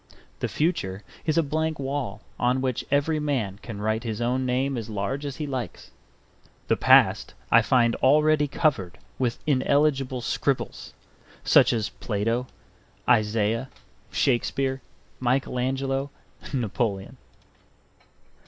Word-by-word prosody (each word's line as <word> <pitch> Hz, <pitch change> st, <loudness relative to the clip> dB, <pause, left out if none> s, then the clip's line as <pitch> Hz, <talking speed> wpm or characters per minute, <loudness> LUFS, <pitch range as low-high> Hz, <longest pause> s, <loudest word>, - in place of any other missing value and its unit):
The -, -, -1 dB
future 100 Hz, -, -1 dB, 0.2 s
is 155 Hz, -, +2 dB
a 165 Hz, -, +4 dB
blank 155 Hz, +2 st, -1 dB
wall 135 Hz, -6 st, -4 dB, 0.2 s
on 125 Hz, +2 st, +2 dB
which 130 Hz, -2 st, -1 dB
every 145 Hz, +3 st, +1 dB
man 125 Hz, -10 st, -2 dB
can 110 Hz, -4 st, -7 dB
write 110 Hz, +2 st, -1 dB
his 110 Hz, -2 st, -3 dB
own 125 Hz, +2 st, 0 dB
name 130 Hz, +2 st, 0 dB
as 115 Hz, -2 st, -5 dB
large 110 Hz, +8 st, -3 dB
as 140 Hz, -, -5 dB
he 155 Hz, -, -4 dB
likes; 130 Hz, -5 st, -5 dB, 0.8 s
the -, -, +3 dB
past -, -, +4 dB, 0.2 s
I 115 Hz, -, +7 dB
find 120 Hz, -1 st, +3 dB
already 150 Hz, +2 st, +4 dB
covered 130 Hz, -, 0 dB, 0.2 s
with 125 Hz, -3 st, 0 dB
illegible 135 Hz, -2 st, +2 dB
scribbles, 135 Hz, +3 st, -2 dB, 0.5 s
such -, -, +5 dB
as 110 Hz, -2 st, -1 dB
Plato, 115 Hz, +4 st, -2 dB, 0.6 s
Isaiah, 115 Hz, +1 st, +2 dB, 0.4 s
Shakespeare, 135 Hz, +1 st, 0 dB, 0.4 s
Michael 130 Hz, 0 st, 0 dB
Angelo, 135 Hz, +2 st, -1 dB, 0.4 s
Napoleon. 115 Hz, -3 st, -2 dB
130 Hz, 120 wpm, -25 LUFS, 115-140 Hz, 0.8 s, I